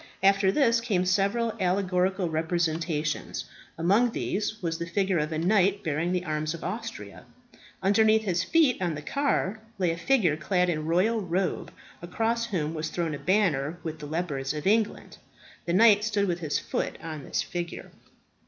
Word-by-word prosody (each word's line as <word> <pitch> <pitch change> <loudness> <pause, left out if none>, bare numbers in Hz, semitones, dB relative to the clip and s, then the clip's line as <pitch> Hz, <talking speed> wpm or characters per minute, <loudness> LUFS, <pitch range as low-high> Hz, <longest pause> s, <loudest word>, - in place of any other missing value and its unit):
After 195 0 +4
this 235 -3 +3
came 195 -6 0
several 200 +5 +1
allegorical 185 0 +1
representations. 160 -1 -1 0.3
Among 200 +9 +3
these 215 -1 -2
was 165 -4 -3
the 170 - -4
figure 190 0 +1
of 150 +1 -2
a 155 - -2
knight 195 +3 +2
bearing 160 +2 -1
the 180 0 -1
arms 155 0 -2
of 170 - -10
Austria. - - -6 0.6
Underneath 220 +3 +4
his 185 -3 0
feet, 285 - +3
on 170 -4 0
the 150 - -7
car, 245 - 0 0.2
lay 180 -3 +1
a 165 - -4
figure 175 - +2
clad 180 +3 +1
in 155 - -2
a - - -4
royal 185 +8 +1
robe, 185 +1 -2 0.3
across 225 +6 -1
whom 165 -8 -2
was 160 0 -3
thrown 170 -3 -2
a 140 - -5
banner 175 -6 +1
with 160 -1 -5
the 150 - -7
leopards 150 -3 -2
of 150 - -5
England. 215 +2 0 0.5
The 170 - -1
knight 210 +1 +6
stood 205 -2 0
with 175 -1 -1
his 155 -4 -1
foot - - -3
on 155 -3 -6
this - - -1
figure. 175 -1 -6
180 Hz, 170 wpm, -27 LUFS, 160-205 Hz, 0.6 s, knight